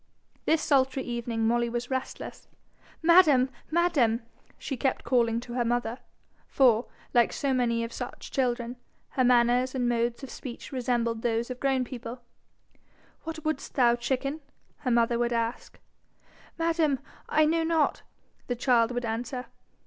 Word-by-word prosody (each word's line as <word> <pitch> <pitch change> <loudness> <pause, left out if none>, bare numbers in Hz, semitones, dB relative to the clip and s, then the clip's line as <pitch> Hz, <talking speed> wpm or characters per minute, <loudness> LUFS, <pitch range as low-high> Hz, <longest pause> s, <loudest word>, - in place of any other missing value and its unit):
This 320 -1 +2
sultry 265 -2 +2
evening 235 -2 -2
Molly 235 +1 +2
was 240 +2 -4
restless. 260 0 -5 0.6
'Madam! 315 -7 +6 0.2
madam!' 300 -10 +2 0.3
she 270 - -4
kept 260 +1 -1
calling 235 -3 +2
to 240 -1 -8
her 245 -1 +1
mother 240 +1 -1 0.5
for, 245 -3 +3 0.3
like 240 -2 +4
so 275 -2 -1
many 235 -2 +1
of 230 0 -5
such 245 - -7
children, 245 -2 -1 0.3
her 260 - +1
manners 245 +1 +3
and 250 -2 0
modes 235 +2 0
of 270 - -7
speech 245 -3 -8
resembled 240 -3 -1
those 235 +1 -1
of 250 - -6
grown 270 -2 +1
people, 245 -1 -7 1.0
'What 320 -1 -6
wouldst 310 0 -3
thou, 240 -3 +5
chicken?' 270 +5 -2 0.4
her 265 - -3
mother 235 0 +2
would 240 0 +1
ask. 230 +1 -3 0.8
'Madam, 330 -4 +2 0.3
I 310 0 +4
know 330 +2 +2
not,' 320 -2 +1 0.5
the 245 - -1
child 235 -2 +3
would 245 0 -2
answer. 240 +3 -3
245 Hz, 145 wpm, -28 LUFS, 235-270 Hz, 1.0 s, Madam